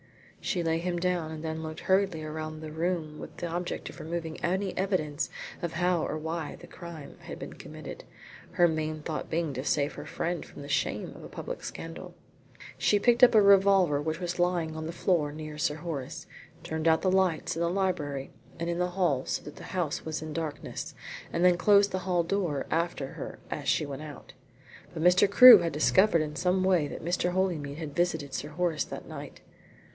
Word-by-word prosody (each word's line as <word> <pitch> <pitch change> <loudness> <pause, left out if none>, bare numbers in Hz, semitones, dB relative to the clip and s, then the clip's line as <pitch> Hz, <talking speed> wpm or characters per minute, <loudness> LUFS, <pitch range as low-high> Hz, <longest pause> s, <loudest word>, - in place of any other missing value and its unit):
She 175 -3 0
laid 165 0 +1
him 175 0 -2
down 175 -2 0
and 160 0 -7
then 160 0 -3
looked 155 0 -6
hurriedly 190 -4 +2
around 155 0 -5
the 155 -1 -7
room 160 -1 -2
with - - -9
the - - -4
object 175 +1 -3
of - - -14
removing 165 0 -5
any 190 +2 0
evidence 165 -6 -1 0.3
of 170 -2 -3
how 175 0 +1
or - - -2
why 160 0 -4
the - - -13
crime 170 -4 -10
had - - -8
been - - -7
committed, - - -9 0.5
her 175 - +5
main 155 -1 -2
thought 155 -1 -4
being 165 -3 -1
to 130 +1 -4
save 145 0 +1
her - - -8
friend 175 0 -2
from - - -11
the - - -8
shame 145 - -1
of - - -11
a - - -9
public - - -6
scandal. - - -7 0.6
She 205 - +4
picked 240 +4 +3
up 245 - +8
a 215 - +8
revolver 195 -6 +5
which 160 +2 -2
was 175 0 -3
lying 175 -3 +1
on 160 0 -4
the - - -3
floor 165 -4 +1
near 155 0 -7
Sir 150 -2 +1
Horace, 160 0 -5 0.4
turned 160 -1 -2
out 160 0 +4
the 185 - +3
lights 185 -5 +1
in 165 - -2
the 170 - +2
library 170 -8 -1 0.3
and 170 - -2
in 170 - -2
the 180 - +2
hall 175 -8 +1
so - - -2
that 150 - -10
the - - -10
house 175 -6 -2
was 155 -1 -4
in 155 -1 -6
darkness, 160 -2 -5 0.4
and 170 +2 +1
then 180 -1 +5
closed 200 +2 +5
the 185 - -1
hall 180 -2 +1
door 170 -6 -1
after 165 -4 -1
her - - -7
as 140 -2 -2
she 150 - +2
went 140 0 -6
out. 150 -3 -10 0.6
But 160 - -2
Mr. 180 +3 +5
Crewe 240 +1 +11
had 170 -1 -1
discovered 170 +3 +4
in 150 -1 -6
some 185 +2 +1
way 180 -5 +3
that - - -7
Mr. 180 +1 0
Holymead 165 -7 -1
had 155 -3 -6
visited 160 -6 0
Sir 150 - -3
Horace 165 0 0
that - - -8
night. - - -9
165 Hz, 205 wpm, -29 LUFS, 155-180 Hz, 0.6 s, Crewe